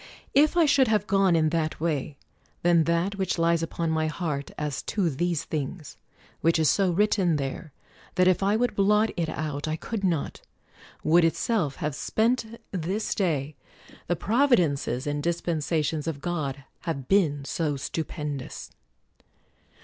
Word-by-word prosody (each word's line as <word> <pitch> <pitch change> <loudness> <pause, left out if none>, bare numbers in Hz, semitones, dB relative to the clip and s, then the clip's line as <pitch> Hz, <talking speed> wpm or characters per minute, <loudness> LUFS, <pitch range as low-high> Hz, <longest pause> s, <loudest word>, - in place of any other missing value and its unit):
If 300 +5 +4
I 335 - +6
should 275 -3 +4
have 215 -1 +2
gone 195 -3 +3
in 155 -1 +3
that 160 -1 -1
way, 150 -3 -2 0.5
then 170 -2 +4
that 170 +4 0
which 190 - 0
lies 170 0 +2
upon 165 0 -2
my 160 0 +1
heart 155 -4 -3
as 150 -2 -3
to 185 -6 +1
these 170 +3 -1
things 155 +1 -5 0.2
— - - -29
which 165 +2 +3
is 155 -4 +4
so 195 -2 +2
written 185 -2 +2
there 145 +3 -4 0.4
that 185 -1 +4
if 185 0 +3
I 200 +2 +2
would 245 +1 +1
blot 210 +2 +3
it 165 -3 -1
out 150 -1 -3
I 155 - -1
could 205 +5 -5
not 170 -6 -1 0.3
— - - -23
would 170 +2 +5
itself 165 - +1
have 150 -1 -3
spent 225 - +1 0.3
this 190 +4 -2
118 - - -12
CROMWELL - - -22
day: 155 -6 0 0.5
the 175 - +1
providences 170 - +2
and 145 0 -2
dispensations 160 -2 -1
of 155 -3 -3
God 145 -5 -3 0.2
have 140 -6 -4
been 150 -8 +2
so 150 -1 -1
stupendous. 150 -1 -5
165 Hz, 165 wpm, -26 LUFS, 150-195 Hz, 0.5 s, I